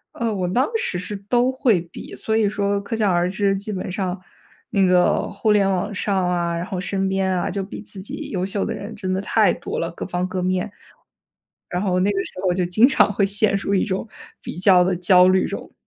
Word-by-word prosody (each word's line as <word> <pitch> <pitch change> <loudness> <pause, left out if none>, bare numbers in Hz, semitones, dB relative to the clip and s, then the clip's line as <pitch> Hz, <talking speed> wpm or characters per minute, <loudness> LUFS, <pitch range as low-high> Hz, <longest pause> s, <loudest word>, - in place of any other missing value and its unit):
呃， 230 -2 -1
我 185 -3 -1
当 245 +10 +1
时 320 - -1
是 205 +3 -5
都 240 +6 +1
会 240 -8 +2
比， 170 +1 -10
所 220 - -1
以 215 -2 +3
说 200 -1 -1
可 225 +3 -4
想 210 -3 +2
而 175 0 +1
知， 195 +1 +1
基 200 +2 -4
本 185 -2 -4
上 185 -1 -3 0.5
那 200 -3 +2
个 180 -1 +3
互 210 +2 0
联 200 -2 +3
网 185 +3 -2
上 190 -2 0
啊， 170 -1 0
然 170 +1 -3
后 185 -1 -4
身 195 +1 -1
边 190 0 0
啊 180 -1 -1
就 195 0 -3
比 200 - -8
自 195 -3 -10
己 195 - -6
优 185 -2 -2
秀 195 +1 -2
的 225 - -2
人 210 +1 -7
真 185 -3 -3
的 190 - -1
太 215 +1 +3
多 - - -5
了， 165 - -2
各 - - -6
方 180 0 -2
各 185 0 -3
面。 185 +2 0 1.0
然 180 +1 -2
后 185 -3 +1
那 200 - +2
个 195 -1 -1
时 - - -9
候 180 - +2
就 180 -1 0
经 215 +7 +4
常 265 - +3
会 200 - +2
陷 200 +1 +2
入 200 0 -1
一 195 - +2
种 195 +2 -3 0.3
比 - - -7
较 185 -1 +6
的 185 +1 +1
焦 180 +1 +5
虑 185 0 +3
中。 - - -7
195 Hz, 255 characters per minute, -22 LUFS, 180-205 Hz, 1.0 s, 较